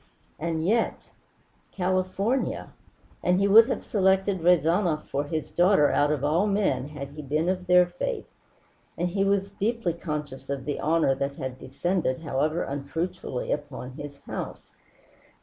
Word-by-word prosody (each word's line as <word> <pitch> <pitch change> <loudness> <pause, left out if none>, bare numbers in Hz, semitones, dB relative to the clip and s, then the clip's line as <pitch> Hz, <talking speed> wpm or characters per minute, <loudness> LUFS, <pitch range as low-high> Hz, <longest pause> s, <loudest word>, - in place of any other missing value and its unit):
And 160 0 -2
yet 225 +5 0 0.6
California! 185 +6 -1 0.5
And 180 +1 +2
he 200 - +3
would 220 +3 +8
have - - -2
selected 190 -2 +2
Rezanov 170 -1 +3
for 140 +1 -2
his 155 0 -4
daughter 175 -4 +4
out 145 +1 +3
of 145 -3 -1
all 165 +8 +2
men 200 -9 +1
had 145 -2 -7
he 150 +2 -8
been 150 +4 -1
of 185 0 -1
their 180 0 +6
faith. 180 - -4 0.7
And 175 +1 0
he 195 +2 0
was 195 0 +1
deeply 210 -3 -1
conscious 150 -5 -5
of 140 -2 -3
the 145 - -2
honor 160 -3 +2
that 140 +1 -3
had 130 -1 -5
descended, 160 0 -1
however 155 +2 0
unfruitfully, 145 0 -4
upon 140 -3 -4
his 140 +1 -9
house. - - -7
165 Hz, 150 wpm, -26 LUFS, 145-190 Hz, 0.7 s, would